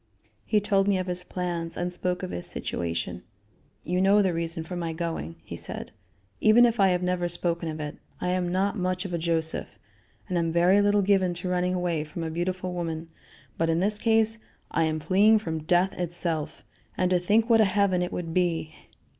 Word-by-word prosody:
He 215 Hz, -, +3 dB
told 200 Hz, -1 st, +2 dB
me 200 Hz, -2 st, +3 dB
of 185 Hz, -, -2 dB
his 180 Hz, 0 st, -2 dB
plans 175 Hz, -2 st, -4 dB
and 175 Hz, 0 st, -2 dB
spoke 180 Hz, +1 st, -1 dB
of 185 Hz, -, -4 dB
his 85 Hz, -, -3 dB
situation: 85 Hz, -7 st, -3 dB, 0.6 s
"You 180 Hz, +3 st, 0 dB
know 200 Hz, +2 st, +5 dB
the 185 Hz, -2 st, +1 dB
reason 165 Hz, 0 st, -2 dB
for 180 Hz, +3 st, -7 dB
my 170 Hz, -2 st, -3 dB
going," 160 Hz, -, -4 dB
he -, -, -7 dB
said, -, -, -5 dB, 0.5 s
"even 225 Hz, +3 st, +6 dB
if 235 Hz, -1 st, +1 dB
I 195 Hz, -, +6 dB
have 180 Hz, -1 st, +1 dB
never 180 Hz, -1 st, 0 dB
spoken 170 Hz, -1 st, -1 dB
of 155 Hz, 0 st, -5 dB
it. 150 Hz, -1 st, -5 dB, 0.2 s
I 180 Hz, -, -1 dB
am 180 Hz, -1 st, 0 dB
not 195 Hz, +3 st, +1 dB
much 185 Hz, +1 st, -1 dB
of 180 Hz, -, -5 dB
a 170 Hz, -, -1 dB
Joseph, 160 Hz, -1 st, -1 dB, 0.6 s
and 180 Hz, -3 st, 0 dB
am 165 Hz, -1 st, 0 dB
very 180 Hz, +4 st, +4 dB
little 205 Hz, 0 st, +3 dB
given 190 Hz, -3 st, +2 dB
to 180 Hz, +1 st, -4 dB
running 180 Hz, 0 st, 0 dB
away 175 Hz, -4 st, -1 dB
from 155 Hz, +2 st, -6 dB
a 160 Hz, -, -3 dB
beautiful 180 Hz, +2 st, -2 dB
woman, 165 Hz, -2 st, -4 dB, 0.5 s
but 165 Hz, 0 st, +2 dB
in 165 Hz, +1 st, +2 dB
this 205 Hz, +3 st, 0 dB
case 225 Hz, 0 st, +2 dB, 0.3 s
I 165 Hz, -, +2 dB
am 155 Hz, 0 st, -1 dB
fleeing 195 Hz, +8 st, +4 dB
from 160 Hz, -7 st, -4 dB
death 180 Hz, +3 st, +3 dB
itself. 170 Hz, -3 st, -3 dB, 0.3 s
And 185 Hz, 0 st, +1 dB
to 180 Hz, -, +4 dB
think 210 Hz, +6 st, +2 dB
what 225 Hz, -2 st, +5 dB
a -, -, +6 dB
heaven 195 Hz, -2 st, +2 dB
it 180 Hz, -, -2 dB
would 165 Hz, -2 st, -4 dB
be. 170 Hz, -3 st, 0 dB
180 Hz, 205 wpm, -26 LUFS, 165-190 Hz, 0.6 s, even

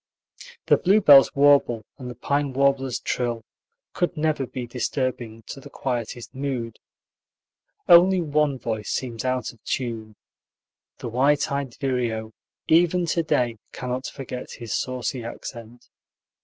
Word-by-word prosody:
The -, -, +5 dB
bluebird's 180 Hz, -8 st, +6 dB
warble 140 Hz, -6 st, +4 dB
and 125 Hz, -2 st, -7 dB
the 125 Hz, -, -8 dB
pine 140 Hz, +2 st, -1 dB
warbler's 135 Hz, -1 st, +1 dB
trill 120 Hz, -2 st, -2 dB, 0.5 s
could 175 Hz, -1 st, -1 dB
never 150 Hz, -4 st, 0 dB
be 125 Hz, 0 st, -5 dB
disturbing 120 Hz, -2 st, -3 dB
to -, -, -8 dB
the -, -, -12 dB
quietest 120 Hz, -2 st, -4 dB
mood. 130 Hz, -5 st, -4 dB, 1.1 s
Only 180 Hz, +2 st, +7 dB
one 150 Hz, -3 st, +1 dB
voice 110 Hz, -3 st, -4 dB
seems 120 Hz, -3 st, -3 dB
out 130 Hz, -2 st, -2 dB
of 115 Hz, -, -25 dB
tune: 115 Hz, -4 st, -4 dB, 0.8 s
the -, -, -6 dB
white 135 Hz, +6 st, +2 dB
eyed 140 Hz, -3 st, -3 dB
vireo, 120 Hz, -5 st, -2 dB, 0.4 s
even 175 Hz, +2 st, +3 dB
to 170 Hz, +1 st, 0 dB
day, 125 Hz, -7 st, 0 dB, 0.2 s
cannot 125 Hz, +1 st, -4 dB
forget 130 Hz, -2 st, -7 dB
his 115 Hz, -3 st, -6 dB
saucy 130 Hz, -1 st, -3 dB
accent. 115 Hz, 0 st, -9 dB
130 Hz, 130 wpm, -24 LUFS, 120-140 Hz, 1.1 s, Only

